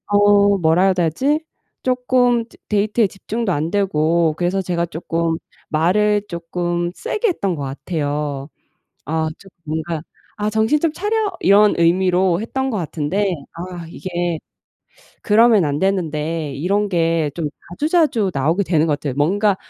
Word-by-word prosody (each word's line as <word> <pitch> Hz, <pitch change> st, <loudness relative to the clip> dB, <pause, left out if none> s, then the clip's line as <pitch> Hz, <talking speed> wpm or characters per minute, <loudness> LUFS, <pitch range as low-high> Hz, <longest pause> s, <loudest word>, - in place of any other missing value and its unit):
어 205 Hz, -1 st, +4 dB
뭐라 165 Hz, +1 st, +3 dB
해야 190 Hz, -, +4 dB
되지? 255 Hz, -, 0 dB, 0.4 s
쪼끔 250 Hz, -2 st, +2 dB
즈 -, -, -19 dB
데이트에 210 Hz, +1 st, +2 dB
집중도 215 Hz, +2 st, -4 dB
안 155 Hz, +2 st, -1 dB
되고 170 Hz, -5 st, +1 dB
그래서 180 Hz, +2 st, 0 dB
제가 170 Hz, -1 st, -1 dB
쪼끔 165 Hz, 0 st, -2 dB, 0.3 s
말을 205 Hz, +6 st, +2 dB
쪼끔 175 Hz, 0 st, -2 dB
세게 450 Hz, -, -1 dB
했던 200 Hz, -, -1 dB
것 145 Hz, -, -5 dB
같아요. 145 Hz, -1 st, -3 dB, 0.6 s
아 160 Hz, +1 st, -1 dB
좀 195 Hz, -, -16 dB, 0.2 s
뭔가 160 Hz, +1 st, -3 dB, 0.4 s
'아 210 Hz, 0 st, 0 dB
정신 220 Hz, +7 st, +2 dB
좀 330 Hz, -3 st, +1 dB
차려.' 420 Hz, +3 st, -1 dB
이런 205 Hz, +1 st, +5 dB
의미로 180 Hz, +1 st, +3 dB
했던 265 Hz, +4 st, -2 dB
것 220 Hz, -, -2 dB
같은데 170 Hz, +4 st, -1 dB, 0.3 s
아 175 Hz, 0 st, -7 dB
이게 175 Hz, -1 st, -3 dB, 0.8 s
그러면 220 Hz, -3 st, +5 dB
안 145 Hz, 0 st, -1 dB
되는데 160 Hz, -5 st, -1 dB
이런 200 Hz, +8 st, 0 dB
게 165 Hz, -4 st, +1 dB
좀 165 Hz, -3 st, -2 dB, 0.2 s
자주자주 290 Hz, -, +1 dB
나오게 160 Hz, +9 st, +1 dB
되는 165 Hz, -2 st, +2 dB
것 150 Hz, -, +2 dB
같아요. 140 Hz, -4 st, -4 dB
뭔가 195 Hz, +7 st, +2 dB
180 Hz, 270 characters per minute, -20 LUFS, 160-210 Hz, 0.8 s, 이런